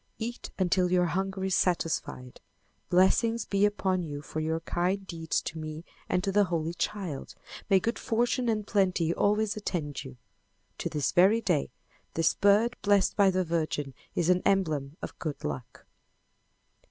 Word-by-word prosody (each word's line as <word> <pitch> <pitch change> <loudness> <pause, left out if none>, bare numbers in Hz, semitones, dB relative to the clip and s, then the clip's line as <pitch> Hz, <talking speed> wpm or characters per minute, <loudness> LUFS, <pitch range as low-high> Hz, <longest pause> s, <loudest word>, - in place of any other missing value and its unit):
"Eat 235 +2 -5
until 180 -1 +2
your 180 -1 +4
hunger 190 +2 -2
is 190 0 0
satisfied. 165 -8 -1 0.5
Blessings 225 +6 +3
be 200 0 +2
upon 190 -3 0
you 145 -2 -6
for 155 - -5
your 160 +1 -1
kind 185 +4 -1
deeds 165 -3 -2
to 165 - -5
me 155 +1 -6 0.2
and 180 - +1
to 195 - 0
the 205 +1 +4
Holy 165 -2 -2
Child. 175 -6 -4 0.3
May 195 -2 +6
good 230 +5 -2
fortune 240 +2 0
and 215 -2 0
plenty 185 -5 +1
always 210 +2 +1
attend 155 -10 -3
you." 130 -2 -10 0.6
To - - -2
this 150 -2 -1
very 190 +5 +5
day 175 - 0 0.5
this 165 -1 +3
bird 210 +4 +3
blessed 200 -2 +3
by 200 -2 +5
the 185 0 +1
Virgin 155 -5 -2 0.2
is 175 +1 +3
an 180 0 +2
emblem 155 -7 0
of - - -7
good 155 -4 -4
luck. 70 -3 -6
180 Hz, 160 wpm, -29 LUFS, 160-200 Hz, 0.6 s, May